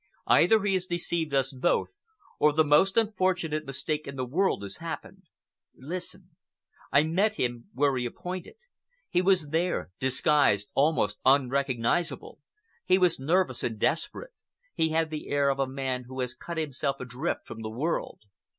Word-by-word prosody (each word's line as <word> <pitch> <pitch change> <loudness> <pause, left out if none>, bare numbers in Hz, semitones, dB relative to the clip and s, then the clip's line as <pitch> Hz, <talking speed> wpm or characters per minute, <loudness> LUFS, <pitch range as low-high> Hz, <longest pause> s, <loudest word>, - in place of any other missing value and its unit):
"Either 220 -2 +5
he 200 -1 +1
has 185 -1 0
deceived 170 -2 -1
us 135 0 +1
both, 135 +7 0 0.4
or 150 - +5
the 160 +2 +3
most 155 +7 +4
unfortunate 185 -8 +1
mistake 150 +3 -3
in 140 - -6
the 130 -1 -2
world 165 - 0
has 100 -1 -6
happened. - - -7 0.6
Listen. 175 +6 -6 0.6
I 140 +2 +5
met 195 +7 +1
him 120 - -3
where 140 0 +2
he 125 -1 -1
appointed. 180 - -7 0.5
He 180 - +2
was 185 -5 +3
there, 165 - -1
disguised, 130 -5 +2
almost 140 -8 +1
unrecognizable. 135 +2 +1 0.4
He 185 - +4
was 180 -5 +3
nervous 155 -2 +1
and 115 -2 -2
desperate; 165 - -1 0.4
he 160 - +1
had 160 0 0
the 155 -1 -6
air 140 -1 +2
of 135 - -4
a 135 - +1
man 130 -1 -3
who 130 +1 -8
has 125 -1 -2
cut 170 +6 -7
himself 140 -3 -2
adrift 125 +1 -3
from 115 - -9
the 110 - -4
world. 140 +10 -3
150 Hz, 160 wpm, -28 LUFS, 130-175 Hz, 0.6 s, Either